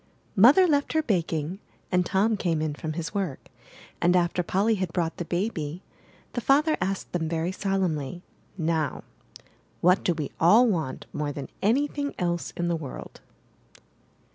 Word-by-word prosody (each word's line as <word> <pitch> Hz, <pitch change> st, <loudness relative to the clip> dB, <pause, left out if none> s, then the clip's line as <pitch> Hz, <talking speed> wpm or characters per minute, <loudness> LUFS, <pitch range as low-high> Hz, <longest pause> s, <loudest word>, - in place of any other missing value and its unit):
Mother 255 Hz, -, +7 dB
left 285 Hz, -2 st, +1 dB
her 315 Hz, 0 st, +2 dB
baking, 170 Hz, -, -1 dB, 0.3 s
and 180 Hz, 0 st, +3 dB
Tom 205 Hz, +5 st, +2 dB
came 170 Hz, -5 st, 0 dB
in 155 Hz, -1 st, -1 dB
from 155 Hz, +1 st, -5 dB
his 165 Hz, +2 st, -4 dB
work; 190 Hz, -10 st, -3 dB, 0.5 s
and 175 Hz, +1 st, +4 dB
after 175 Hz, 0 st, +2 dB
Polly 195 Hz, +6 st, +1 dB
had 185 Hz, -5 st, -2 dB
brought 165 Hz, -2 st, -1 dB
the 175 Hz, -, -4 dB
baby, 175 Hz, -3 st, -3 dB, 0.5 s
the 240 Hz, -, -2 dB
father 300 Hz, +6 st, +3 dB
asked 190 Hz, +2 st, -2 dB
them 160 Hz, -3 st, -1 dB
very 165 Hz, +2 st, -1 dB
solemnly: 180 Hz, -6 st, -2 dB, 0.4 s
''Now, 160 Hz, -2 st, -1 dB, 0.8 s
what 180 Hz, +2 st, +4 dB
do 175 Hz, -, +1 dB
we 150 Hz, -3 st, -4 dB
all 215 Hz, +9 st, +6 dB
want 160 Hz, -, -2 dB
more 150 Hz, -1 st, -2 dB
than 140 Hz, -1 st, -7 dB
anything 285 Hz, +6 st, 0 dB
else 175 Hz, -2 st, -1 dB
in 175 Hz, -1 st, -1 dB
the 170 Hz, -, +1 dB
world?' 150 Hz, -5 st, -8 dB
175 Hz, 155 wpm, -26 LUFS, 160-205 Hz, 0.8 s, Mother